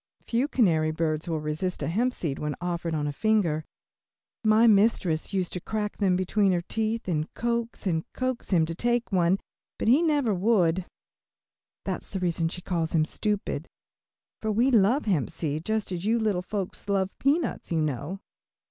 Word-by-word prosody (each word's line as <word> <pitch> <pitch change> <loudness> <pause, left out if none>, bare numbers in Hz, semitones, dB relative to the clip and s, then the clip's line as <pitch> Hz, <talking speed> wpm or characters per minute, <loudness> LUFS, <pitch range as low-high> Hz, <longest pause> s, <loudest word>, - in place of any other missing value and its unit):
Few 245 +4 +1
canary 165 - +2
birds 155 0 -1
will 160 -2 0
resist 155 +5 -2
a - - -1
hemp 240 +9 0
seed 145 -5 -3
when 150 -1 -2
offered 170 -2 -2
on 150 -1 -1
a 145 - -1
finger. 180 -5 +1 0.8
My 215 +1 +5
mistress 200 -7 +3
used 185 -3 -1
to 180 - -3
crack 210 +1 -3
them 190 -3 +2
between 190 +1 +2
her 175 - +1
teeth 225 0 -1
and 155 -3 -1
coax 235 -1 -2
and 165 -4 +1
coax 255 -1 -3
him 170 -5 +4
to 165 - -4
take 240 +6 0
one, 180 0 +3 0.4
but - - -2
he 260 +8 +6
never 290 -9 +2
would. 185 -3 +2 1.0
That's - - -4
the 195 - -3
reason 170 -2 0
she 180 +1 -7
calls 170 -3 -1
him 155 -1 +4
stupid, 200 -5 -2 0.7
for 220 - 0
we 240 +6 +3
love 235 +5 +4
hemp 175 - +1
seed 155 0 -3
just 220 -2 -1
as 175 -1 -3
you 225 +3 +2
little 210 -5 +1
folks 195 +1 -5
love 195 -1 0
peanuts, 290 - 0
you 165 - +1
know. 150 +6 -3
190 Hz, 175 wpm, -27 LUFS, 165-220 Hz, 1.0 s, he